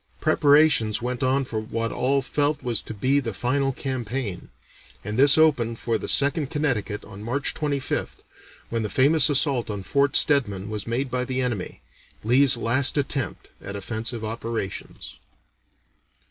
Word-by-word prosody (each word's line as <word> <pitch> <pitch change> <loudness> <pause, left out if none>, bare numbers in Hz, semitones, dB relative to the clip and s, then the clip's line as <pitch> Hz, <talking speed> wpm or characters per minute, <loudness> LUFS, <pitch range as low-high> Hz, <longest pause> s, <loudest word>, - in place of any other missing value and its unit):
Preparations 145 -8 +3
went 125 +1 -4
on 135 +1 +1
for 110 -3 -3
what 115 +1 -3
all 135 +2 0
felt 145 +1 -1
was 120 -4 -1
to - - -10
be 130 +7 +2
the 115 -7 -4
final 135 +4 0
campaign; 125 -6 -4 0.5
and 105 +2 -4
this 140 +4 +6
opened 125 -8 +3
for 115 -1 -1
the - - -5
Second 140 0 +2
Connecticut 120 -10 -2
on 100 -1 -11
March 125 +6 -1
25th, 145 -3 -3 0.5
when 115 0 -2
the 105 - -3
famous 145 +5 +4
assault 140 -5 +2
on 100 -2 -4
Fort 140 +5 +1
Stedman 105 -9 +2
was 105 -1 -5
made 125 +3 -2
by 125 0 -1
the 130 +1 -3
enemy, 120 -8 -3 0.4
Lee's 125 +3 +5
last 130 +5 +1
attempt 140 -2 -3
at 100 - -6
offensive 110 +3 -4
operations. 115 -2 -6
125 Hz, 150 wpm, -24 LUFS, 110-140 Hz, 0.5 s, this